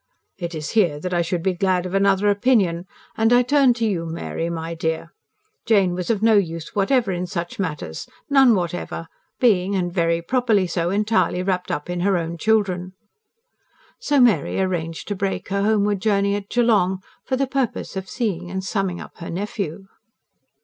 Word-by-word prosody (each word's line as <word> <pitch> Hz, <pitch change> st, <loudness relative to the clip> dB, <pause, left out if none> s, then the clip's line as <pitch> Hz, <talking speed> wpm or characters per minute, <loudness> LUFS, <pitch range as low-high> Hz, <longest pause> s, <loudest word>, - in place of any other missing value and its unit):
"It 170 Hz, -2 st, -4 dB
is 155 Hz, -1 st, -4 dB
here 175 Hz, -10 st, +2 dB
that 180 Hz, +3 st, -4 dB
I 175 Hz, -, +2 dB
should 170 Hz, 0 st, -2 dB
be 190 Hz, 0 st, +1 dB
glad 180 Hz, 0 st, 0 dB
of 180 Hz, -, -5 dB
another 195 Hz, 0 st, +3 dB
opinion 200 Hz, -6 st, +2 dB, 0.3 s
and 225 Hz, +1 st, +2 dB
I 245 Hz, 0 st, +6 dB
turn 265 Hz, -1 st, +4 dB
to 230 Hz, -1 st, -1 dB
you, 175 Hz, -6 st, -1 dB
Mary, 165 Hz, 0 st, -4 dB
my 165 Hz, 0 st, -4 dB
dear. 160 Hz, -1 st, -3 dB, 0.5 s
Jane 200 Hz, -5 st, +3 dB
was 180 Hz, 0 st, -4 dB
of 220 Hz, -2 st, 0 dB
no 225 Hz, -2 st, +5 dB
use 165 Hz, -4 st, -2 dB
whatever 210 Hz, +1 st, +2 dB
in 180 Hz, 0 st, -3 dB
such 175 Hz, +1 st, -5 dB
matters, 150 Hz, -, -4 dB, 0.2 s
none 270 Hz, -5 st, +5 dB
whatever, 175 Hz, -2 st, -3 dB, 0.3 s
being, 200 Hz, -5 st, +3 dB
and 175 Hz, -2 st, -1 dB
very 170 Hz, -2 st, +1 dB
properly 225 Hz, -2 st, +2 dB
so, 170 Hz, -1 st, -1 dB
entirely 195 Hz, -3 st, +1 dB
wrapped 185 Hz, -1 st, -1 dB
up 150 Hz, -, -3 dB
in 175 Hz, 0 st, -3 dB
her 190 Hz, +1 st, +2 dB
own 165 Hz, 0 st, -4 dB
children." 190 Hz, -4 st, +1 dB, 1.1 s
So 290 Hz, -1 st, +1 dB
Mary 245 Hz, -6 st, +3 dB
arranged 170 Hz, -4 st, -2 dB
to 205 Hz, -, -1 dB
break 195 Hz, -1 st, -3 dB
her 200 Hz, 0 st, 0 dB
homeward 205 Hz, -1 st, +1 dB
journey 200 Hz, -1 st, +2 dB
at 200 Hz, -1 st, -4 dB
Geelong, 200 Hz, -6 st, +2 dB, 0.2 s
for 260 Hz, -, -1 dB
the 275 Hz, +1 st, +1 dB
purpose 265 Hz, -5 st, -2 dB
of 190 Hz, -1 st, -5 dB
seeing 180 Hz, -7 st, -2 dB
and 190 Hz, +1 st, -4 dB
summing 190 Hz, -2 st, -2 dB
up -, -, -11 dB
her 170 Hz, -, -7 dB
nephew. 195 Hz, -1 st, -4 dB
190 Hz, 180 wpm, -22 LUFS, 175-215 Hz, 1.1 s, I